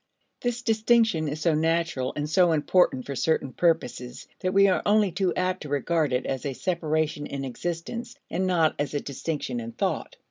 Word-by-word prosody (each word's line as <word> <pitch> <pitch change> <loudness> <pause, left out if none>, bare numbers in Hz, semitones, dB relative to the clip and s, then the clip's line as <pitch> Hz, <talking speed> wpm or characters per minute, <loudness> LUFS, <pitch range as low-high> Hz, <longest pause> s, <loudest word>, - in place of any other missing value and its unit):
This 245 0 -2
distinction 220 -7 +3
is 150 +2 -4
so 165 -1 +3
natural 160 -4 0
and 150 0 -2
so 170 +2 +4
important 150 -4 +2
for 140 - -5
certain 140 -3 0
purposes, 125 -7 -1
that 185 - -1
we 195 +1 +5
are 185 - +2
only 205 -2 +3
too 185 0 0
apt 185 0 -1
to 150 - -7
regard 150 +1 +1
it 125 +1 0
as 135 -2 -3
a 140 - -2
separation 155 -2 -1
in 140 -1 -4
existence 175 - -5
and 185 +1 -1
not 165 -4 +3
as 145 0 -2
a - - +1
distinction 140 -2 -4
in 115 0 -6
thought. - - -2
160 Hz, 185 wpm, -26 LUFS, 140-185 Hz, -, we